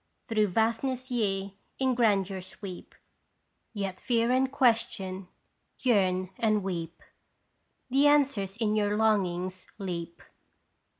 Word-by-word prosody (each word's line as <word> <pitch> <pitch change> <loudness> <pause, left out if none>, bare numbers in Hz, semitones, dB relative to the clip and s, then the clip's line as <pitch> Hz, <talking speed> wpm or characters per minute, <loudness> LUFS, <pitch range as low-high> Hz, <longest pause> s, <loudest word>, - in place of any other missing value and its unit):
Through 215 -3 +2
vastness 235 +6 0
ye 195 -4 -1 0.2
in 260 -1 +2
grandeur 200 -5 +1
sweep 185 0 -9
i - - -40 0.7
Yet 195 -4 -4
fear 235 -1 +1
and 260 +1 +2
question, 195 -7 +1 0.5
yearn 185 -6 +2
and 215 -3 +2
weep! 170 -3 -5 0.9
The 275 +3 +5
answers 265 -10 +2
in 215 -2 +1
your 210 -1 +1
longings 185 -4 0
leap 175 -4 -5
205 Hz, 110 wpm, -29 LUFS, 190-235 Hz, 0.9 s, The